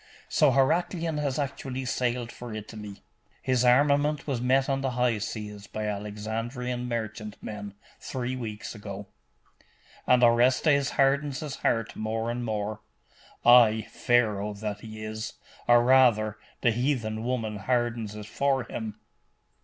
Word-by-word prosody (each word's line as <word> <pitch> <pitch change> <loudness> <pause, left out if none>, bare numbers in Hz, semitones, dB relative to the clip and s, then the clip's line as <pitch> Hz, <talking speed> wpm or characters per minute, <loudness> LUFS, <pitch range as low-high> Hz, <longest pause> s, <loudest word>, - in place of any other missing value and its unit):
So 150 - +4
Heraclian 160 +4 +1
has 140 -3 -1
actually 135 -2 -3
sailed 125 -1 -1
for 120 -3 -8
Italy?' 105 -1 -8 0.4
'His 130 -1 +2
armament 145 +4 +3
was 135 -5 -2
met 130 +2 +3
on 135 -1 0
the 135 - 0
high 120 -3 +2
seas 105 -1 -6
by 110 +1 -4
Alexandrian 110 +4 -3
merchantmen, 105 -3 -5 0.2
three 130 -1 -3
weeks 110 -4 -6
ago.' 105 -2 -7 1.0
'And 125 -1 +5
Orestes 130 +4 +4
hardens 140 0 +2
his 150 -3 -5
heart 115 -1 0
more 110 +1 -2
and 120 +1 -3
more?' 110 -1 -3 0.6
'Ay, 115 -3 +6
Pharaoh 105 -4 +1
that 105 0 -4
he 110 0 -9
is; 110 0 -5 0.3
or 120 0 +6
rather, 120 -5 +4 0.2
the 120 - +4
heathen 115 -3 -1
woman 115 -4 -2
hardens 120 -1 -1
it 105 -1 -7
for 135 +4 0
him. 110 -2 -6
120 Hz, 130 wpm, -27 LUFS, 110-130 Hz, 1.0 s, Ay